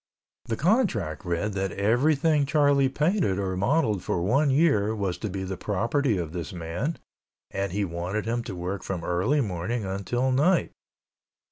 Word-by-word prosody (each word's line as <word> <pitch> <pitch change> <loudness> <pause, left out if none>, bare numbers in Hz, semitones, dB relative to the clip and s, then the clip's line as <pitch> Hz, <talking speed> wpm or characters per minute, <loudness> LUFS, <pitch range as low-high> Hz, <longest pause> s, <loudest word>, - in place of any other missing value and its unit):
The 115 - -2
contract 115 - +1
read 90 +4 -1
that 95 -1 -2
everything 140 - +2
Charlie 140 -2 +3
painted 150 - +1
or 95 -2 -1
modeled 105 - +1
for 90 - -1
one 140 +10 +3
year 130 -8 +3
was 100 -4 -1
to 110 - -3
be 95 0 -4
the 95 0 -4
property 115 +5 0
of 85 -3 -4
this 85 -5 -4
man 90 - -3 0.5
and 100 -1 -2
he 100 +2 0
wanted 90 +5 -3
him 120 +1 -1
to 95 - -5
work 90 +3 -4
from 90 -3 -4
early 95 - +1
morning 100 +2 -2
until 100 +7 -1
night. 155 +8 +2
105 Hz, 160 wpm, -26 LUFS, 95-140 Hz, 0.5 s, Charlie